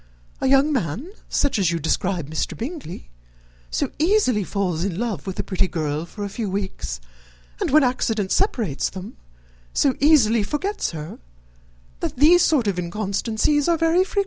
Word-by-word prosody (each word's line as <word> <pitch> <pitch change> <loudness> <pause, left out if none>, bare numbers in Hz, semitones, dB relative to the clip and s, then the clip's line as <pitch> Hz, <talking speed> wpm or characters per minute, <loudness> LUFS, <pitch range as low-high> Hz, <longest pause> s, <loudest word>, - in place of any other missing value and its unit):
A 265 - 0
young 275 +3 +4
man, 240 - -2 0.2
such 285 -6 +1
as 185 -4 +3
you 170 - 0
describe 170 +1 -1
Mr. 160 - -3
Bingley, 235 - -7 0.6
so 60 - -1
easily 315 - +3
falls 180 -4 -1
in 185 -3 -2
love 210 -9 -3
with 190 - -4
a - - -1
pretty 190 0 0
girl 155 -1 -2
for 205 +3 -7
a 200 - -3
few 220 -4 -1
weeks, 190 - -4 0.6
and, - - 0
when 300 +2 +5
accident 225 -6 0
separates 225 - 0
them, 190 +2 -8 0.6
so 275 - +3
easily 255 -7 +5
forgets 305 - -2
her, 155 -1 -7 0.8
that - - -3
these 330 +6 +6
sort 290 -8 +3
of 195 -3 0
inconstancies 215 - 0
are 335 - +3
very 330 +3 +3
frequent." 390 +2 -2
215 Hz, 165 wpm, -23 LUFS, 180-290 Hz, 0.8 s, these